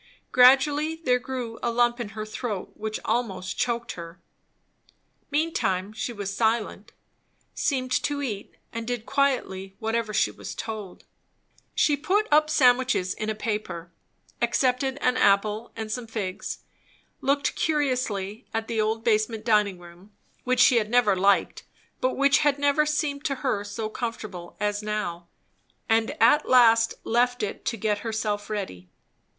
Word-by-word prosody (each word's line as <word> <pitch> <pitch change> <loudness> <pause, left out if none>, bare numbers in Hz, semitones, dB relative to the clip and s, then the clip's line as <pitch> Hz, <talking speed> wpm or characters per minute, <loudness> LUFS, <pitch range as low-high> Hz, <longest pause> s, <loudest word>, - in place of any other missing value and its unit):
Gradually 285 +5 +5
there 255 -6 +1
grew 245 -2 -5
a - - 0
lump 240 +1 +2
in 235 -4 -4
her 215 - -3
throat 215 -2 -5
which 215 0 -4
almost 195 -5 -1
choked 235 0 -1
her. 170 0 -9 1.1
Meantime 215 - 0
she 220 +2 -3
was 200 -3 -5
silent, 220 -2 0 0.6
seemed 255 -3 -1
to 290 -1 -1
eat, 210 -7 -5 0.2
and 230 0 -5
did 245 -2 -3
quietly 245 -9 0
whatever 225 0 -1
she 210 - +2
was - - -8
told 215 -4 -6 0.7
She 295 - +3
put 380 +9 +1
up 305 +1 +5
sandwiches 250 -9 +3
in 215 - -4
a 215 - -1
paper; 210 -6 -4 0.5
accepted 255 +2 +1
an 250 0 +2
apple 210 +2 +2
and 220 -1 -5
some 240 +1 -4
figs; 205 -5 -5 0.6
looked 280 +1 +1
curiously 250 -8 -1
at 225 0 -1
the 225 -2 0
old 220 +1 -1
basement 220 0 +1
dining 210 -4 +3
room, 175 +3 -15 0.3
which 255 0 0
she 250 -1 +6
had 215 -2 +1
never 235 -4 +4
liked, 195 +1 +2 0.4
but 255 - 0
which 280 +1 +4
had 290 -1 +2
never 285 +1 +2
seemed 300 -2 -1
to 280 -3 0
her 210 -6 0
so 210 +2 -4
comfortable 215 -6 -6
as 205 0 -1
now; 190 -5 -3 0.6
and 225 +6 +1
at 295 - +4
last 230 -2 +5
left 245 0 +1
it 205 - -4
to 230 - -1
get 210 0 0
herself 215 -2 -3
ready. 140 - -5
225 Hz, 145 wpm, -26 LUFS, 210-255 Hz, 1.1 s, she